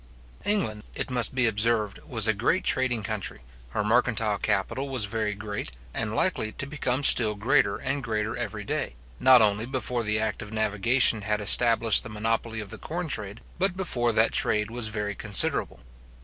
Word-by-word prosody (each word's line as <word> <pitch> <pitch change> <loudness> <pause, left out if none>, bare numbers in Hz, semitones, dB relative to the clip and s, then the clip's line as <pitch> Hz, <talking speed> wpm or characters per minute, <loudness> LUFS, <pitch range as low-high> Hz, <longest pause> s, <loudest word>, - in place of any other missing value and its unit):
England, 110 - -1
it - - -3
must 125 0 0
be 130 -2 +2
observed, 110 -1 0
was 115 -3 -1
a 110 - +3
great 120 - 0
trading 125 -5 0
country, 105 - -5 0.3
her 105 - -2
mercantile 110 -2 +1
capital 110 +7 -1
was 130 -6 0
very 105 -1 -2
great, 105 0 -6 0.2
and - - -3
likely 110 - -1
to - - -3
become 140 -2 -2
still 110 -5 +6
greater 115 0 +2
and 135 +2 -3
greater 110 -2 -2
every 110 -3 -5
day, 65 - -3 0.2
not 130 -3 +6
only 105 +2 0
before 125 -2 -2
the 105 -1 0
act 110 -1 -2
of 105 - -9
navigation 110 +2 +2
had 105 +1 -1
established 115 +1 +4
the 120 - -9
monopoly 110 +1 -2
of 105 -2 -7
the - - -8
corn 175 +2 -4
trade, 105 -6 -4 0.2
but 185 -1 0
before 120 -11 0
that 110 0 +2
trade 105 0 0
was 120 -2 -3
very 105 -1 -3
considerable. 100 -1 +3
110 Hz, 175 wpm, -26 LUFS, 105-125 Hz, 0.3 s, still